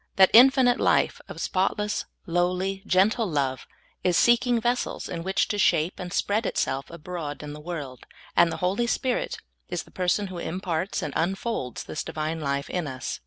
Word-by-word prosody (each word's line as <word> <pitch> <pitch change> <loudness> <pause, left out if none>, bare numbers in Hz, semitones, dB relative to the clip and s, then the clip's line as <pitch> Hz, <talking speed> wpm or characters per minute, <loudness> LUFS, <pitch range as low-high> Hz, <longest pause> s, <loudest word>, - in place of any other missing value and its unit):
That 190 -1 +6
infi 265 +3 +8
nite 245 0 +3
life - - +2
of - - -8
spotless, 210 +3 0 0.2
lowly, 180 +3 0
gentle 205 +5 +3
love 135 -4 -1 0.4
is 180 -2 +3
seeking 240 0 +4
ves 240 +2 +1
sels - - -4
in 170 - -4
which 190 +3 +1
to 205 - -1
shape 165 -2 +2
and 180 -1 -6
spread 205 +3 0
itself 135 +1 -1
abroad 165 -3 -6
in 145 0 -6
the 150 - -9
world, 150 -7 -7 0.3
and 170 -1 +5
the - - -4
H0I3' 200 +7 0
Spirit 255 -1 -1 0.3
is - - -3
the - - -20
person 185 +3 0
who 185 -2 -6
imparts 180 0 -2
and 145 - -4
unfolds 190 - -2
this 155 - -5
Divine 160 0 -3
life 140 -1 -1
in 175 -4 -2
us. 130 -2 -5
180 Hz, 180 wpm, -26 LUFS, 155-205 Hz, 0.4 s, infi